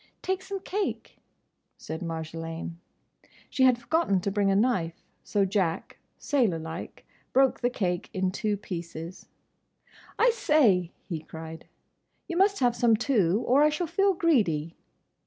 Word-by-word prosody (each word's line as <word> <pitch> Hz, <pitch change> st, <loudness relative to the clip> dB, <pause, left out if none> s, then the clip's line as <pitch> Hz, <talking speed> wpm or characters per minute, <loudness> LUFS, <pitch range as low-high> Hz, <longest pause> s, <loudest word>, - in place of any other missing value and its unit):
"Take 375 Hz, 0 st, -1 dB
some 385 Hz, 0 st, -6 dB
cake?" 405 Hz, +2 st, -4 dB, 0.6 s
said 160 Hz, 0 st, -6 dB
Marjolaine. 165 Hz, 0 st, -5 dB, 0.7 s
She 260 Hz, -, +3 dB
had 255 Hz, -2 st, +5 dB
forgotten 240 Hz, -, +1 dB
to 200 Hz, -, -1 dB
bring 200 Hz, 0 st, +1 dB
a 195 Hz, -, +3 dB
knife, 195 Hz, -7 st, 0 dB, 0.2 s
so 200 Hz, -2 st, +1 dB
Jack, 185 Hz, -4 st, -1 dB, 0.2 s
sailorlike, 170 Hz, -, -2 dB, 0.3 s
broke 270 Hz, 0 st, +4 dB
the 245 Hz, -, +1 dB
cake 180 Hz, -7 st, -2 dB
in 185 Hz, -1 st, 0 dB
two 205 Hz, +1 st, -1 dB
pieces. 170 Hz, -2 st, -7 dB, 0.9 s
"I -, -, +5 dB
say!" 230 Hz, -, +3 dB, 0.2 s
he 170 Hz, -5 st, -3 dB
cried, 160 Hz, +1 st, -9 dB, 0.6 s
"you 345 Hz, -, -4 dB
must 395 Hz, 0 st, +3 dB
have 245 Hz, -1 st, +3 dB
some 235 Hz, -2 st, +4 dB
too, 215 Hz, -5 st, +2 dB
or 270 Hz, +3 st, +4 dB
I 300 Hz, -, +6 dB
shall 305 Hz, +4 st, -1 dB
feel 390 Hz, +4 st, +2 dB
greedy!" 185 Hz, -, +1 dB
205 Hz, 140 wpm, -27 LUFS, -, 0.9 s, I